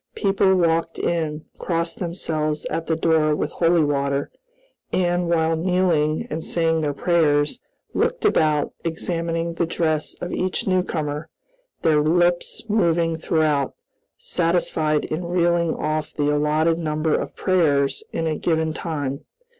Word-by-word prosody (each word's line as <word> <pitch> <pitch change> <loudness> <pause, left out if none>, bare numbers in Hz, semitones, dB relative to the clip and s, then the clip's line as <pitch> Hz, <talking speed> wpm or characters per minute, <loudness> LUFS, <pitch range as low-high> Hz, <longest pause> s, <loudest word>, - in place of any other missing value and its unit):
People 195 -1 +2
walked 165 -2 +1
in, 160 -2 -2
crossed 165 -1 -2
themselves 155 -4 -2
at 165 - -3
the 160 - +1
door 160 -2 +2
with - - -2
holy 170 -1 +3
water, 140 -1 -1 0.6
and, 175 -1 +1
while 165 -1 +2
kneeling 165 -3 +1
and 160 +1 -3
saying 165 -1 +1
their 150 -2 0
prayers, 155 - +2 0.3
looked - - 0
about 155 - +2
examining 165 0 -2
the 170 0 -1
dress 155 -2 -1
of 175 - -6
each 185 0 -1
newcomer, 160 -5 -1 0.5
their 155 -2 +4
lips 175 +3 +1
moving 170 -6 +2
throughout, 155 -4 0 0.4
satisfied 165 -3 0
in 165 +3 -3
reeling 170 -1 +1
off 155 0 -2
the 145 0 +1
allotted 155 +3 +2
number 155 -1 0
of - - -2
prayers 150 -7 +1
in 165 - -2
a 155 -1 0
given 160 -1 0
time. 145 -5 -4
165 Hz, 130 wpm, -22 LUFS, 155-170 Hz, 0.6 s, their